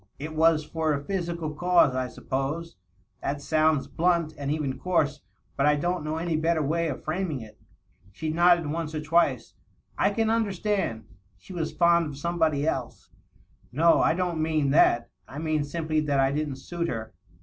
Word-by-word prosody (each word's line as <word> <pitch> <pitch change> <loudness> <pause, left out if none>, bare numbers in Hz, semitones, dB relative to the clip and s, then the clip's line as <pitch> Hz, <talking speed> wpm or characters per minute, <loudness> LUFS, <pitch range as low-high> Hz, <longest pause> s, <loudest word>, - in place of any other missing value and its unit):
It 155 +2 -6
was 160 -1 +3
for 160 0 -1
a 140 0 -3
physical 170 -3 -3
cause, 175 -3 +3
I 130 0 -1
suppose. 140 +7 -4 0.5
That 140 +1 -2
sounds 155 0 +2
blunt, 170 -2 0
and 140 -1 -4
even 145 -3 -2
coarse. 150 -5 0 0.3
But 140 - +2
I 150 - +5
don't 175 +2 -1
know 155 +1 -3
any 165 0 -1
better 160 0 +1
way 165 +4 0
of 140 - -5
framing 155 -4 -2
it." 110 -1 -13 0.5
She 155 +10 -4
nodded 175 0 +4
once 155 +1 -3
or 155 - -2
twice. 150 -6 +1 0.2
" - - -41
I - - +4
can 220 +2 0
understand... 205 - -1 0.3
She 185 - -12
was 160 -3 -2
fond 170 -1 +3
of 140 -2 -8
somebody 160 -2 0
else." 130 -6 -4 0.3
" - - -32 0.3
No; 165 +6 +4
I 160 - +3
don't 175 -3 -1
mean 155 -3 +1
that. 120 -5 +3 0.2
I 135 - -10
mean 155 -1 0
simply 155 +1 -2
that 145 -2 0
I 135 0 +3
didn't 145 -1 -2
suit 170 +5 -4
her. 110 -4 -5
155 Hz, 180 wpm, -26 LUFS, 145-170 Hz, 0.5 s, I